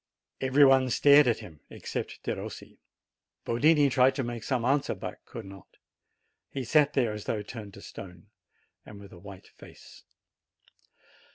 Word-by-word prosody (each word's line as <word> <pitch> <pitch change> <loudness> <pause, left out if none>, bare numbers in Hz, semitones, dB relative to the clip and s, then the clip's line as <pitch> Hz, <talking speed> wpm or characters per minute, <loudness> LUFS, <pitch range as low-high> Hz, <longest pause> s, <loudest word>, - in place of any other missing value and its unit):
Every 135 +2 +5
one 135 -1 +4
stared 145 +3 +5
at 120 - 0
him 80 -4 -13
except - - -6
Perossi. - - -7 0.7
Yotini 145 +5 +3
tried 130 +1 +3
to 135 - -2
make 120 -1 -6
some 125 -4 -1
answer, 140 +2 +1
but - - -8
could - - -9
not; 95 -1 -14 0.7
he 135 - -5
sat 150 +3 +3
there 120 -6 +1
as 105 -1 -8
though 105 -2 -2
turned 105 -2 -10
to 100 - -13
stone, 90 -2 -11 0.6
and 100 - -12
with 100 -1 -13
a 85 - -13
white 100 0 -13
face. - - -16
120 Hz, 155 wpm, -28 LUFS, 100-135 Hz, 0.7 s, Every